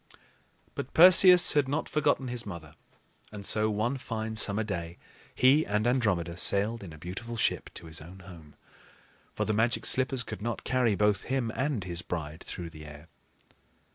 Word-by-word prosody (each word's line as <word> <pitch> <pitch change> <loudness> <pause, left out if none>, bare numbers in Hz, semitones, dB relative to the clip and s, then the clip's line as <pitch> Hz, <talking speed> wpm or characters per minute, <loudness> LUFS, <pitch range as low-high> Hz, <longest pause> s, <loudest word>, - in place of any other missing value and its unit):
But - - -7
Perseus 180 +1 +8
had 145 -2 +2
not 145 +4 -2
forgotten 140 -3 0
his 120 -1 -3
mother; 85 -7 -9 0.6
and 105 -2 -7
so, 110 +1 +3
one 110 +6 -1
fine 110 -2 -5
summer 110 0 +1
day, 85 -5 -6 0.4
he 135 +5 +4
and 105 -2 -2
Andromeda 100 -9 0
sailed 105 +4 +1
in 90 - -10
a 75 - -12
beautiful 95 +9 -7
ship - - -1
to 85 - -10
his 80 -1 -5
own 90 +4 -13
home; 85 -5 -14 0.8
for - - -2
the 110 - -1
Magic 115 +3 0
Slippers 130 -1 +1
could 110 -2 -8
not 115 +1 -4
carry 125 -4 +1
both 105 0 0
him 130 -4 -1
and 135 -6 -2
his 85 -1 -4
bride 80 -3 -6
through 85 -2 -7
the 80 -1 -12
air. 75 +2 -13
110 Hz, 170 wpm, -28 LUFS, 85-125 Hz, 0.8 s, Perseus